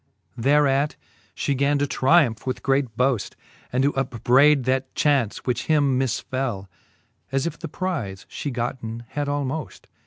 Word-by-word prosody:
X. 120 -1 -6
Thereat 145 0 +3 0.4
(he 140 - 0
gan 140 +2 +2
to 145 - +1
triumph 135 -5 +2
with 130 - -3
great 135 -5 0
boaft, 125 -4 0 0.4
And 130 +2 +1
to 145 - +2
upbrayd 135 +2 +3
that? 130 +1 -1
chaunce, 135 -8 +1
which 125 -2 -1
him 145 -4 +3
misfell. 130 -5 -2 0.6
As 135 0 0
if 170 -1 -4
the 165 - -5
prize 130 - -4
fhe 145 - -5
gotten 120 -1 -4
had 145 -1 -3
almoft. 145 +1 -3
135 Hz, 150 wpm, -24 LUFS, 125-145 Hz, 0.6 s, Thereat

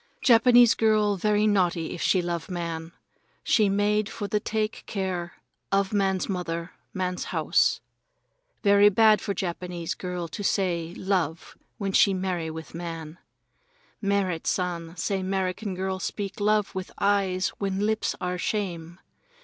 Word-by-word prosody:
Japanese 240 0 +6
girl 215 -2 +2
very 210 +2 +2
naughty 180 -5 +1
if - - -7
she 185 -2 +2
love 170 0 -3
man. 170 -2 -4 0.5
She 215 -3 +3
made 205 +1 +1
for 205 - -5
the 210 +2 0
take 215 0 -2
care 185 -4 -3 0.4
of 195 +1 +1
man's 195 -2 +1
mother, 170 -3 -3 0.2
man's 180 -1 -2
house. - - +2 0.8
Very 200 0 +6
bad 215 +1 +5
for 200 - -3
Japanese 175 -1 -3
girl 180 -1 -5
to 165 +6 -6
say 175 -4 0
love 180 -4 -2 0.2
when 200 -2 -2
she 195 0 +4
marry 180 -3 -2
with 160 0 -8
man. 165 -1 -6 0.8
Merrit 200 -5 0
San 175 -2 -2
say 190 +4 -1
'Merican 190 +1 -2
girl 190 0 -2
speak 200 +1 -4
love 210 0 +2
with 190 0 -5
eyes 195 -2 +1
when 195 0 -1
lips 220 0 0
are 180 0 -3
shame. 175 -5 -3
190 Hz, 140 wpm, -26 LUFS, 175-205 Hz, 0.8 s, Japanese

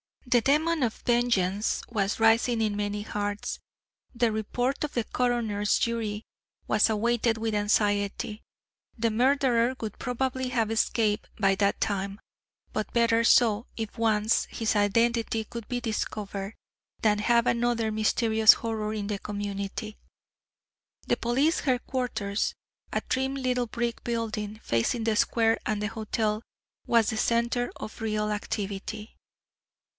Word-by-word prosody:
The 245 -1 +3
demon 310 +5 +2
of 235 -3 +1
vengeance 220 -5 +1
was 205 -3 -1
rising 225 +1 +4
in 215 -2 0
many 205 0 -2
hearts. 205 -1 -3 0.6
The 235 -1 +2
report 245 +6 -1
of 300 - -3
the 240 - 0
coroner's 225 -4 0
jury 220 -2 -1 0.4
was - - +4
awaited 230 +1 +1
with 220 0 -2
anxiety. 205 0 0 0.6
The 230 0 +1
murderer 255 0 +2
would 215 -3 -6
probably 260 +1 -2
have 230 -3 0
escaped 220 -1 +1
by 195 -2 +3
that 200 0 +1
time 200 -1 -1 0.5
but 215 -1 -3
better 230 -1 +3
so 230 -1 +4
if 225 0 -5
once 220 -1 +2
his 225 -1 -2
identity 225 +2 +2
could 230 0 -8
be 245 -1 -2
discovered, 210 -3 -4 0.5
than 210 -1 +3
have 235 +2 +3
another 235 -2 +1
mysterious 220 0 +5
horror 220 -2 -3
in 210 -2 -3
the 205 -1 -2
community. 205 +1 -5 1.1
The - - +2
police 270 +8 +1
headquarters, 250 -6 -1 0.4
a - - +1
trim 265 +1 -1
little 250 -2 0
brick 235 0 -3
building 220 -2 -3
facing 115 - 0
the 220 -1 +1
square 225 -1 +2
and 210 -1 -1
the 210 - 0
hotel, 215 0 -2 0.5
was 230 -2 +4
the 220 - -2
centre 235 +2 +1
of 220 - -8
real 215 -1 -1
activity. 210 +1 -4
225 Hz, 130 wpm, -27 LUFS, 210-240 Hz, 1.1 s, mysterious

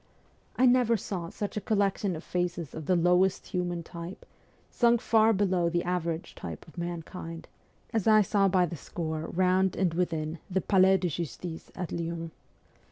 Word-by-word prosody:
I 255 - +4
never 245 -2 +4
saw 180 -4 -5
such 205 +2 -5
a - - -1
collection 200 -2 0
of 160 - -7
faces 175 -3 -2
of 160 -2 -7
the 185 - +4
lowest 180 +2 +3
human 175 -2 -2
type, 170 +2 -8 0.5
sunk 235 -1 +4
far 225 0 +4
below 185 -4 +2
the 175 0 0
average 170 -2 -2
type 80 -2 -8
of 160 - -16
mankind, 170 -1 -6 0.5
as 220 -3 0
I 215 -1 +7
saw 200 0 +2
by 185 -1 +3
the 170 - -5
score 160 0 -4
round 185 +1 +2
and 180 -4 +1
within 165 -2 -1
the 190 0 +1
Palais 190 0 +4
de 180 - -1
Justice 170 +1 -5
at 180 -2 -4
Lyons. 165 -1 -4
180 Hz, 165 wpm, -29 LUFS, 170-195 Hz, 0.5 s, I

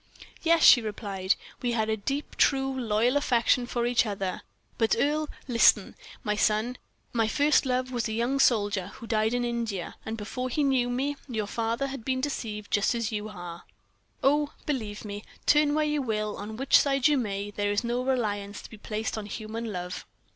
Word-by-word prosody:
"Yes," 330 -1 +3
she 245 - +9
replied, 200 -3 -1 0.3
"we 245 -1 0
had 220 -2 +1
a 220 - +1
deep, 275 +8 -4
true, 270 -1 +2
loyal 235 +1 +1
affection 245 -2 +2
for 240 -1 -1
each 245 0 +3
other, 195 -4 -3 0.4
but, 225 -1 +3
Earle, 300 +1 +1 0.2
listen, 230 -5 +4 0.3
my 210 0 0
son. 215 +4 +1 0.3
My 225 -2 +2
first 290 +4 +3
love 255 0 0
was 240 -2 -1
a - - -4
young 240 +5 0
soldier, 205 -7 +2
who - - -10
died 220 +1 +1
in 245 0 0
India; 230 -7 -3
and 220 +1 -4
before 250 +4 -4
he 295 +4 0
knew 260 -3 +2
me, 275 +4 -1
your 220 -4 -2
father 230 +5 -1
had 275 -3 -6
been 260 +2 0
deceived 220 -7 -4
just 205 +3 +2
as 230 -1 -1
you 210 0 -3
have 175 -4 -8
been. - - -31 0.5
Oh! 290 +2 +2
believe 220 -8 -3
me, 205 0 -6 0.2
turn 295 0 +4
where 305 0 +2
you 300 -1 0
will, 215 -4 -2
on 215 +2 -7
which 270 +2 +5
side 275 -1 +3
you 300 - +3
may, 205 -5 -2
there 205 0 -1
is 205 +3 0
no 240 +1 -1
reliance 205 -6 -1
to - - -12
be 220 - -10
placed 220 +1 -3
on 205 - -7
human 220 +2 -5
love." 180 -1 -5
230 Hz, 195 wpm, -27 LUFS, 210-260 Hz, 0.5 s, she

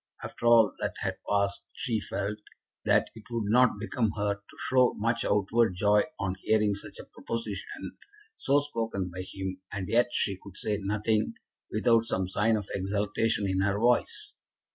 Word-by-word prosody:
After 120 - -3
all 115 -2 +6
that - - -2
had - - -2
passed 100 -1 +1
she 115 -3 -1
felt 100 +1 -3 0.5
that - - +3
it 110 -2 -13
would 115 -3 -1
not 125 -2 +5
become 110 +1 0
her 105 0 +1
to 100 0 -17
show 130 -1 +4
much 115 +2 0
outward 105 0 +2
joy 105 +2 +4
on 95 -1 -2
hearing 105 -2 +2
such 100 - -6
a - - -8
proposition, 115 -3 -6 0.4
so 140 +1 +2
spoken 115 -9 -3
by 90 +1 -5
him, 95 -1 -5
and 95 -2 -4
yet 120 +1 +4
she 95 -5 0
could 100 -2 -11
say 105 -1 -1
nothing 105 +2 0 0.4
without 115 +1 +3
some 95 -5 -1
sign 110 +4 +2
of 105 -2 -5
exultation 100 +2 0
in 95 0 +1
her 100 0 +1
voice. 120 +3 +1
105 Hz, 165 wpm, -29 LUFS, 100-115 Hz, 0.5 s, all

